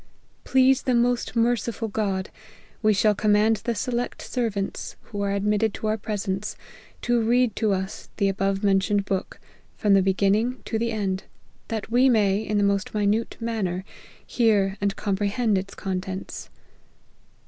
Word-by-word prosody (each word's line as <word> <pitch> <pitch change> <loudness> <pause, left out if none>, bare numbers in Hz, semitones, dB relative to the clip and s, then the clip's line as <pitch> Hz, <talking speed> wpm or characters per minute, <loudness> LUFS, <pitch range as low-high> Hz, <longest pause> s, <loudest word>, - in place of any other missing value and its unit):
Please 265 0 +4
the 255 - +1
most 240 +1 +1
merciful 230 -1 0
God, 200 -3 -2 0.5
we 215 -1 +4
shall 210 +1 +3
command 210 +2 +3
the 235 +1 -3
select 240 +3 -3
servants, 215 -6 -3
who 205 -3 -6
are 200 0 0
admitted 210 +2 +1
to - - -6
our 215 0 +1
presence, 200 -1 -3 0.5
to 240 -1 +2
read 240 0 +2
to 220 -3 +1
us 190 0 -3
the 200 - +2
above 195 +1 0
mentioned 200 0 +2
book, 190 -1 -3 0.4
from 205 -2 +3
the 195 - +6
beginning 200 +6 +1
to 220 - -2
the 230 0 0
end, 195 -3 -2 0.4
that 225 -1 -4
we 255 +3 +5
may, 205 -4 +3
in 210 -1 -1
the 205 - +3
most 200 +1 0
minute 210 +2 0
manner, 200 -6 -2 0.4
hear 205 -5 +2
and 200 -1 0
comprehend 205 +2 0
its 195 +1 -3
contents. 190 0 -5
210 Hz, 150 wpm, -25 LUFS, 195-230 Hz, 0.5 s, the